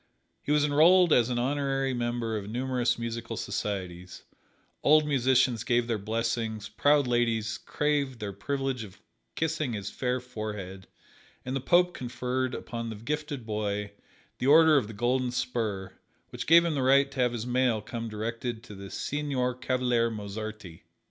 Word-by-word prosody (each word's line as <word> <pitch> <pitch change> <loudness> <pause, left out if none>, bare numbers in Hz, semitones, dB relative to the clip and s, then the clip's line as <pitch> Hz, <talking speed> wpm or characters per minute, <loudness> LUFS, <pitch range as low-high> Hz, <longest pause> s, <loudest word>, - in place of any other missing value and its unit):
He - - -3
was 150 0 +4
enrolled 165 +4 +5
as 120 0 +4
an 120 - -1
honorary 135 +1 0
member 120 -2 -2
of 105 -1 -4
numerous 125 0 0
musical 115 -1 -4
societies, 95 -3 -4 0.6
old 155 +1 +5
musicians 130 -4 +2
gave 120 -1 +2
their 115 -2 -1
blessings, 110 0 -2
proud 145 +6 +3
ladies 115 -3 0
craved 145 -3 -1
the 100 -2 -4
privilege 135 +3 -2
of 95 -2 -12 0.4
kissing 155 -5 -1
his 100 -2 -4
fair 125 0 -1
forehead, 105 -6 -7 0.6
and 130 +1 -3
the 135 - -1
Pope 180 +4 +3
conferred 125 +1 -2
upon 115 -1 -5
the 110 - -5
gifted 145 +2 -4
boy 105 -1 -2 0.5
the 125 - 0
Order 160 +1 +7
of 130 -7 +2
the 110 - -8
Golden 125 +4 0
Spur, 110 -6 -2 0.4
which - - -6
gave 170 +2 +7
him 170 - 0
the 140 - -1
right 135 +2 +4
to 135 - -8
have 125 -1 +3
his 115 -1 -4
mail 125 -2 +2
come 115 +2 -6
directed 115 +2 -4
to 105 - -11
"The 100 0 -9
Signor 135 -2 -2
Cavaliere 125 -2 +1
Mozarti." 110 -4 -7
120 Hz, 160 wpm, -28 LUFS, 110-135 Hz, 0.6 s, Order